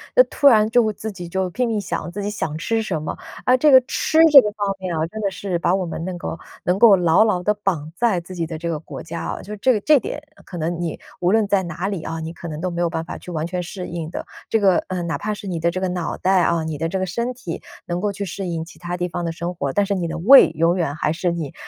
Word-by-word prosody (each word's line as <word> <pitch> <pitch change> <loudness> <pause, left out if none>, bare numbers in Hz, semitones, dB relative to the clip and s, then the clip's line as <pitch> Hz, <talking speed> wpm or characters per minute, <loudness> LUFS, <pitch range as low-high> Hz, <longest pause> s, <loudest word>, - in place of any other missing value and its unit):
就 - - +8
突 285 - +3
然 215 -5 +6
就 245 +2 +4
会 215 -2 0
自 220 +2 -6
己 180 -3 -8
就 190 +1 -1
拼 245 +7 -1
命 225 -2 0
想 185 - -4
自 200 +4 -5
己 205 - -2
想 160 -7 -3
吃 225 +7 -1
什 185 -8 -3
么。 155 - -5 0.3
啊， 255 - +4
这 300 +3 +4
个 260 -2 +8
吃 270 +4 -1
这 280 -2 +11
个 210 - -1
方 205 -2 -1
面 185 -3 -3
哦， 160 0 0
真 220 - -6
的 200 - +1
是 190 -2 -3
把 175 +2 +2
我 190 -1 -1
们 165 0 -5
能够 175 -2 -5 0.2
能 180 +2 +1
够 220 -3 +8
牢 180 +3 +4
牢 185 -5 0
地 210 - +2
绑 180 -7 -2
在 220 -6 +2
自 180 +2 -11
己 170 -2 -3
的 160 -1 -5
这 170 +2 -4
个 160 -2 -2
国 - - -9
家 165 +1 -5
哦。 - - -4
就 210 - -8
这 255 +5 +3
个 210 - -1
这 300 +5 +5
点 295 - -5 0.2
可 175 - -8
能 170 +1 -2
你 170 -2 -3 0.2
无 175 - +1
论 220 -1 +3
在 200 -1 +2
哪 175 +2 -4
里 195 -5 -3
哦， 160 0 -4
你 160 +1 -5
可 170 - -9
能 155 -1 -6
都 185 - -1
没 170 0 -3
有 170 - +1
办 165 -1 -3
法 - - -7
去 - - -12
完 160 -2 -2
全 180 +1 -3
适 180 +1 -6
应 165 -2 -5
的。 - - -6 0.2
这 - - +3
个， 190 -3 +5
呃， 185 -1 -3
哪 170 -1 -2
怕 210 +1 -3
是 205 - -9
你 175 -3 -3
的 170 +1 +2
这 185 +2 -3
个 190 - 0
脑 180 -2 -3
袋 190 -1 +2
啊、 170 -1 +1
你 160 -1 -4
的 165 +3 -1
这 190 - -2
个 190 - -1
身 235 +7 -2
体 185 -10 -7 0.3
能 175 0 -2
够 210 - 0
去 200 - -4
适 195 +1 -5
应 165 -2 -3
其 165 -1 -14
它 175 +1 -4
地 180 0 -2
方 175 +1 -4
的 165 - -2
生 170 +2 -4
活， 140 -5 -3
但 205 - +2
是 200 0 -1
你 175 -3 -2
的 165 0 -4
胃 240 +12 +8
永 165 +3 +1
远 160 -5 -1
还 150 0 0
是 170 +2 -1
你， 160 -5 -5
180 Hz, 325 characters per minute, -21 LUFS, 165-205 Hz, 0.3 s, 这